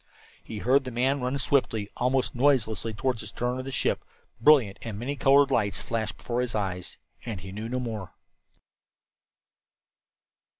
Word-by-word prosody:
He 110 - -7
heard 130 +6 +3
the 130 - -5
man 130 +3 +1
run 125 +2 -1
swiftly, 125 -6 +1
almost 125 +1 +1
noiselessly 115 -5 +1
toward 125 +2 -1
the - - -6
stern 125 +1 -2
of 130 - -5
the 135 - -5
ship; - - 0 0.4
brilliant 115 -7 +5
and 110 -3 -5
many 130 +6 -3
colored 140 0 +5
lights 100 -2 +1
flashed 110 -2 -3
before 120 0 -2
his 125 -2 -2
eyes 95 -4 -3 0.3
and 110 -6 -5
he 95 - -8
knew 110 +3 -5
no 125 +1 -1
more. 110 -7 -5
120 Hz, 160 wpm, -27 LUFS, 110-130 Hz, 0.4 s, brilliant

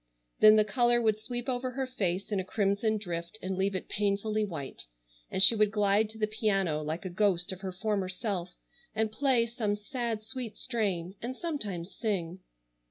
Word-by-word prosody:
Then 215 0 +9
the 215 -1 +5
color 240 +2 +3
would 220 -2 +2
sweep 240 +2 -5
over 255 0 -1
her 265 +1 -2
face 195 -6 -2
in 200 - +1
a - - -1
crimson 205 +2 +1
drift 170 -2 -5
and 190 -1 -3
leave 195 +1 0
it 185 - -4
painfully 210 +1 0
white, 160 - -5 0.4
and 190 - +3
she 200 - +9
would 215 -1 +4
glide 205 +1 +2
to 220 - -8
the 215 - +2
piano 195 -7 0
like 155 +4 -4
a - - -2
ghost 180 -2 +2
of 190 - -7
her 190 -1 -3
former 195 0 -1
self 185 -2 -3 0.4
and 220 0 +1
play 255 -1 +3
some 225 -3 -1
sad 225 0 -3
sweet 235 -1 -6
strain, 195 -8 -1
and 250 +2 -4
sometimes 205 - -4
sing. 190 -6 -2
210 Hz, 185 wpm, -30 LUFS, 190-225 Hz, 0.4 s, Then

